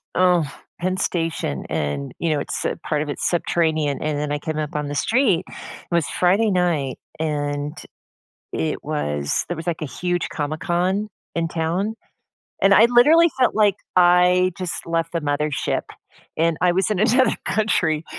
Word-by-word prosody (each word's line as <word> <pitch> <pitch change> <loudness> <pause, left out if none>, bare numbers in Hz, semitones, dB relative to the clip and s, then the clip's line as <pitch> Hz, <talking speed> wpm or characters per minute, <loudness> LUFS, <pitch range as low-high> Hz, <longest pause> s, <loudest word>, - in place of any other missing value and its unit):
oh, 175 -6 +3 0.3
Penn 185 +1 0
Station, 165 - -2
and, 70 -1 -2
you 165 - 0
know, 150 - +1
it's - - -4
uh, - - 0
part 150 -2 0
of 150 - -8
it's - - -1
subterranean, 160 -4 0
and 150 -1 -1
then 150 0 -2
I 145 - -1
came 155 +1 -4
up 150 -1 -3
on 150 -1 -2
the 145 - -4
street 210 - +2
it - - -12 0.4
was 170 -3 +1
Friday 195 +5 +2
night, 170 -8 0 0.2
and 145 -1 -2 0.8
it 80 - -2
was 75 -1 -1
there 175 - -4
was, 165 - -7
like, 165 -2 -2
a 155 - -1
huge 175 +4 -2
Comic 155 +1 -3
Con 190 +4 0 0.3
in 165 0 0
town. 175 +7 -1 0.7
And 195 0 +5
I, 220 +4 +7
literally, 300 +8 +6
felt 255 - +3
like 210 -3 +4 0.2
I 180 +1 +5
just 180 -2 -4
left 165 0 -1
the 170 - -1
mother 150 +1 -1
ship, 140 - -1 0.5
and 165 0 +2
I 180 -1 +4
was 190 +2 +1
in 210 - 0
another 235 +2 +3
country 165 -8 +1
170 Hz, 175 wpm, -22 LUFS, 150-185 Hz, 0.8 s, I